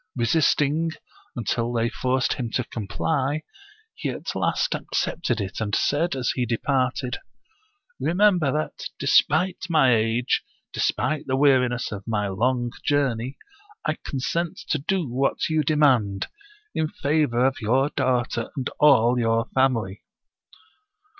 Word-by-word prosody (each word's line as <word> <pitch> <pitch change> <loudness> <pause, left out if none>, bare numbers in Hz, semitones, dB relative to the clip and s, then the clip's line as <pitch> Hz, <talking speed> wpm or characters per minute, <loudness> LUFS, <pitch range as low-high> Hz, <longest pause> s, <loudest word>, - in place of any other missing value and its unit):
Resist 130 +5 +2
ing 155 +4 0 0.5
until 120 0 -1
they 115 -1 +1
forced 130 +1 0
him 120 -3 -4
to 125 - +1
comply, 135 +8 -2 0.5
he - - -4
at - - -5
last - - 0
accepted 120 -9 -2
it, 100 +1 -4
and 105 -2 0
said, 160 +2 +1
as 130 -2 0
he 125 - -1
departed: 125 +1 -1 0.4
" 430 +3 -41
Remember 180 -5 +3
that, 155 +2 -3
despite 175 +5 +3
my 150 -7 +5
age, 115 +2 +1 0.3
despite 155 -1 -1
the 130 - +1
weariness 130 -3 +2
of 100 0 -7
my 105 -2 0
long 120 +5 0
journey, 135 -3 0 0.5
I 155 -1 0
consent 165 +5 -2
to 155 - +1
do 175 +3 -1
what 130 +6 0
you 155 -1 +2
demand, 135 -10 +2 0.5
in 160 - 0
favor 140 -5 +1
of 130 -1 0
your 130 +6 +2
daughter 120 -3 0
and 130 - -2
all 125 -4 +5
your 115 +1 +1
family." 115 -7 +1
130 Hz, 135 wpm, -24 LUFS, 120-150 Hz, 0.5 s, my